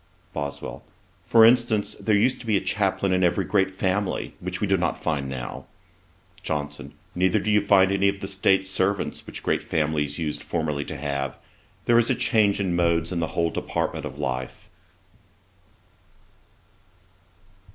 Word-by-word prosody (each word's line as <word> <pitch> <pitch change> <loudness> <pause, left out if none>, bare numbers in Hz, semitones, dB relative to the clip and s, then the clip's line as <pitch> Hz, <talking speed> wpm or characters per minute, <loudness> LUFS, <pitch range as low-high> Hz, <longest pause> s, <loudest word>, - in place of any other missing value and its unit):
BOSWELL. 70 -1 -5 0.4
'For 115 -1 +6
instance, 120 -3 +3
there 110 - +2
used 125 +5 +2
to 120 - -11
be 105 -2 +3
a - - -1
chaplain 100 -2 0
in 90 0 +2
every 85 - +2
great 95 -2 +2
family, 95 +1 -2
which 90 +1 -4
we - - 0
do 95 -1 +2
not 85 -2 -1
find 70 -4 -2
now.' 65 -2 -6 0.8
JOHNSON. 75 -1 -4 0.2
'Neither 90 0 +2
do 105 - 0
you 105 0 +4
find 100 -1 +4
any 100 0 +3
of 100 0 -4
the 95 - -5
state 95 0 +2
servants 95 +1 -1
which - - -8
great - - +1
families 75 -2 -1
used 80 -3 -3
formerly 75 -4 -2
to 75 - -6
have. 70 -2 -3 0.5
There 120 0 +5
is 120 - +2
a - - +3
change 105 -4 +2
of 100 - 0
modes 85 -2 +1
in 90 - -1
the 80 - 0
whole 85 -1 +2
department - - -3
of - - -10
life.' 65 -1 -4
95 Hz, 160 wpm, -24 LUFS, 80-100 Hz, 0.8 s, For